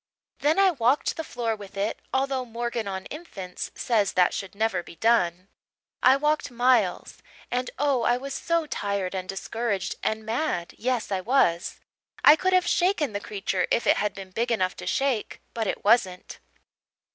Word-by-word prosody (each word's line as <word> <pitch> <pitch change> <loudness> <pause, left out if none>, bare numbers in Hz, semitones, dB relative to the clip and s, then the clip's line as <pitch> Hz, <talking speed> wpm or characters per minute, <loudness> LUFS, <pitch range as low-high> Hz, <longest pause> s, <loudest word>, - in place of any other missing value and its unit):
Then 305 +4 +2
I 390 -1 +5
walked 255 -2 +1
the 320 - -4
floor 235 -6 -2
with 200 -1 -11
it 205 +3 -1
although 265 -1 0
'Morgan 235 -2 -3
on 190 -1 -4
Infants' 195 - -7
says 215 -5 +1
that 180 -1 +3
should 195 -1 -5
never 220 -3 0
be 170 - -13
done. 185 -3 +2 0.5
I 260 +1 +6
walked 300 +2 0
miles, 240 -6 +1 0.3
and 250 0 -1
oh, 275 -2 +2
I 240 +1 +2
was 275 +2 -6
so 335 +3 0
tired 200 -9 -2
and 185 0 -4
discouraged 200 0 -3
and 220 0 -2
mad 220 - -2
yes, 245 -1 -2
I 190 -1 0
was. 185 -7 +1 0.4
I 295 - +10
could 375 +4 0
have 365 -1 +4
shaken 350 - +1
the 205 - -2
creature 195 -3 -2
if 235 - +1
it - - +4
had 210 -2 -1
been 190 -1 -9
big 235 +5 -1
enough 185 -5 +1
to - - -7
shake, 270 -6 -1
but 225 -2 -2
it - - -3
wasn't. 190 -5 +2
230 Hz, 175 wpm, -26 LUFS, 195-265 Hz, 0.5 s, I